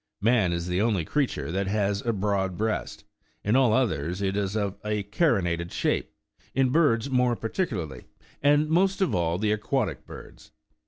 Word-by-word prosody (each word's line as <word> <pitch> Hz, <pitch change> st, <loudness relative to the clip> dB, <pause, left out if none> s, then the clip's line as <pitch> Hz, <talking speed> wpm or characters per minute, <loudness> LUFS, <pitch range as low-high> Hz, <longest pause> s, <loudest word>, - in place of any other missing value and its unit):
Man 110 Hz, -4 st, +3 dB
is 85 Hz, 0 st, -2 dB
the 90 Hz, +2 st, 0 dB
only 105 Hz, -7 st, +1 dB
creature 140 Hz, -, -1 dB
that 95 Hz, +2 st, -1 dB
has 100 Hz, 0 st, 0 dB
a 120 Hz, -, +1 dB
broad 95 Hz, -3 st, -1 dB
breast; 110 Hz, 0 st, -2 dB, 0.4 s
in 105 Hz, +4 st, +1 dB
all 130 Hz, -4 st, +4 dB
others 90 Hz, -, 0 dB
it 100 Hz, -1 st, -1 dB
is 100 Hz, 0 st, -1 dB
of 100 Hz, -3 st, -2 dB
a 105 Hz, -1 st, -1 dB
carinated 95 Hz, -, 0 dB
shape, -, -, -1 dB, 0.4 s
in 135 Hz, 0 st, +3 dB
birds 140 Hz, -5 st, +2 dB
more 125 Hz, -2 st, +2 dB
particularly, 105 Hz, -, -3 dB, 0.4 s
and 145 Hz, +2 st, +4 dB
most 185 Hz, +5 st, +2 dB
of 190 Hz, -, +2 dB
all, 85 Hz, -1 st, +1 dB
the 105 Hz, +2 st, 0 dB
aquatic 105 Hz, -2 st, -1 dB
birds. -, -, -12 dB
105 Hz, 165 wpm, -26 LUFS, 95-125 Hz, 0.4 s, all